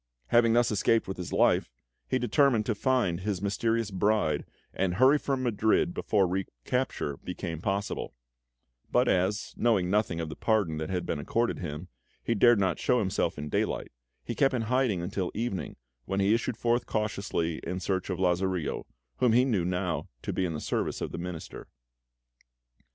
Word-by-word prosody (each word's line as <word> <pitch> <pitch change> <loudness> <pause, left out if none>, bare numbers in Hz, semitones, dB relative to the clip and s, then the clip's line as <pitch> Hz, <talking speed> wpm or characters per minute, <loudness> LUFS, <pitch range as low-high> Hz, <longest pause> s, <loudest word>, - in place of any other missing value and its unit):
Having 115 -1 +5
thus 120 0 +3
escaped 110 +2 +2
with 95 - -4
his 90 -2 -6
life, - - +3 0.4
he 130 - +1
determined 125 -2 +3
to 115 - +1
find 105 -6 +1
his 100 -1 -2
mysterious 110 +2 0
bride 100 -3 +1 0.3
and 90 -2 0
hurry 130 +7 +5
from 135 -2 -1
Madrid 115 - +2
before 105 - +2
recapture 90 - -2
became 85 -3 -5
possible; 100 +2 -2 0.8
but - - +3
as, 95 +3 +1
knowing 100 -6 +2
nothing 105 -5 +1
of 80 - -2
the 75 - -6
pardon 100 -8 +1
that 80 - -4
had 90 -1 -2
been - - -2
accorded 115 +11 0
him, 75 +4 -5 0.4
he 115 - +1
dared 120 +1 +5
not 95 -1 +1
show 125 - +2
himself 95 -5 0
in 75 0 -5
daylight, - - -1 0.3
he 120 - -4
kept 135 +2 +2
in 115 - 0
hiding 120 -6 +1
until 95 0 -2
evening, 105 -7 -3 0.3
when 95 - -1
he 100 +2 +3
issued 115 0 -1
forth 120 +1 +1
cautiously 100 -6 -1
in 90 +2 -4
search 95 0 -2
of 95 - -2
Lazarillo, 90 -2 0 0.3
whom 125 -3 +3
he 125 +2 +5
knew 115 -7 +1
would 85 - -1
now 90 -5 -2 0.2
be 95 - 0
in 85 - -2
the - - -3
service - - -2
of - - -3
the - - -5
Minister. 90 -2 -7
100 Hz, 175 wpm, -28 LUFS, 90-115 Hz, 0.8 s, Having